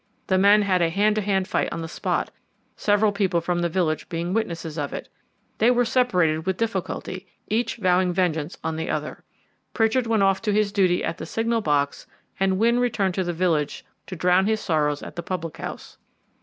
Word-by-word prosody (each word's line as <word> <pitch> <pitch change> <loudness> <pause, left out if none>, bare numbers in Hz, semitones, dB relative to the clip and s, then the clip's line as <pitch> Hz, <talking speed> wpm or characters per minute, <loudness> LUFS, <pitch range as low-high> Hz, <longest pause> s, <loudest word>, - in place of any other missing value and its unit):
The 190 -1 +2
men 205 +2 +6
had 185 -3 +2
a 170 - +3
hand 205 +5 +2
to - - +2
hand 190 -2 0
fight - - 0
on 165 - -4
the - - -5
spot, 165 - -2 0.4
several 205 0 +2
people 195 -4 +1
from 175 +1 -1
the 175 0 0
village 165 -3 -1
being 170 +2 -3
witnesses 170 -7 -2
of 145 -2 -3
it. - - -6 0.5
They 225 - +5
were 245 0 +3
separated 180 -10 +1
with 190 -1 0
difficulty, 190 -3 -3 0.2
each 230 +3 0
vowing 185 -3 +2
vengeance 170 -3 -1
on 160 -1 -2
the 160 - -3
other. - - -4 0.5
Pritchard 230 +2 +2
went 220 -3 +2
off 195 -1 +2
to 210 -2 0
his 210 -1 +2
duty 185 -3 +2
at 170 - -3
the - - -6
signal 230 0 0
box 145 -5 0 0.3
and 190 -1 +2
Wynne 235 +3 +3
returned 210 -6 +1
to 190 - -1
the 175 - -2
village 165 -4 -1 0.2
to 185 - -6
drown 180 +3 +3
his 220 0 +1
sorrows 150 -6 0
at - - -9
the 170 - -3
public 170 -3 -5
house. - - -8
185 Hz, 200 wpm, -24 LUFS, 170-210 Hz, 0.5 s, men